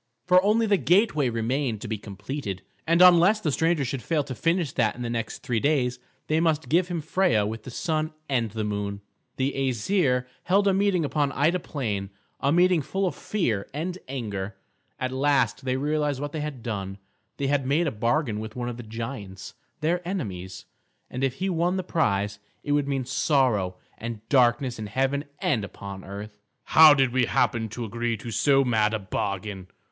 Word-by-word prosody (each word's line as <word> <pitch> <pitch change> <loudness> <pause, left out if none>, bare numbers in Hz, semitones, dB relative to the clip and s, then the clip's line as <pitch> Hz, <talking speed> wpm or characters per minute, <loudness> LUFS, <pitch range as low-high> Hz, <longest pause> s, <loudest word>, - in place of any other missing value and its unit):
For 180 0 +6
only 220 +3 +3
the 205 -2 +3
gateway 175 - +3
remained 115 +1 -1
to - - -5
be 110 -1 -3
completed, 100 0 -6 0.2
and 170 +2 +5
unless 180 +4 +7
the 165 -8 -1
stranger 160 0 +1
should 130 +1 -3
fail 155 +1 0
to 135 -2 -6
finish 165 +1 0
that - - +1
in 125 - -6
the 120 - -3
next 115 -1 -4
three 120 -2 0
days, 125 -3 +1 0.3
they 155 +1 +1
must 160 -2 +1
give 175 +2 +3
him 175 -3 -3
Freia 165 - +2
with 110 0 -6
the - - -6
Sun 155 +3 -1 0.2
and 115 -6 -1
Moon. 105 -2 -3 0.4
The 135 +1 0
Æsir 130 - +1 0.2
held 200 +2 +3
a 195 - +4
meeting 190 -4 +2
upon 145 -1 0
Ida 160 +6 +2
Plain, 105 - -3 0.3
a 140 - +1
meeting 175 0 +4
full 190 +8 -2
of 180 - 0
fear 115 - -2
and 180 +4 -3
anger. 105 -7 -4 0.4
At 130 0 -2
last 135 0 +1
they 130 0 0
realised 145 -1 0
what 145 0 -4
they 155 - -4
had 145 -6 -5
done; 100 -4 -4 0.4
they 140 - -2
had 135 -1 +1
made 155 +5 +2
a 150 - 0
bargain 115 +1 0
with 110 0 -7
one 120 -1 -3
of 120 - -6
the - - -6
giants, 110 -4 -7 0.3
their 170 +3 +1
enemies; 100 - -5 0.5
and 130 +1 -3
if 135 -1 +1
he 190 - -2
won 175 +1 +1
the 185 - -2
prize, 105 - 0 0.2
it 145 - -3
would 145 -1 +2
mean 135 -2 -1
sorrow 125 - +1 0.2
and 115 -1 -6
darkness 125 -2 +3
in 110 - -4
heaven 135 +6 0
and 115 -8 0
upon 100 -1 -8
earth. 105 +2 -8 0.2
"How 155 -2 +8
did 135 -3 +2
we 130 -1 +3
happen 115 -1 +1
to 120 +2 -5
agree 115 +1 -2
to 115 +2 -7
so 135 +3 +3
mad 110 -2 +2
a - - +1
bargain?" 100 -1 -4
130 Hz, 190 wpm, -26 LUFS, 110-155 Hz, 0.5 s, How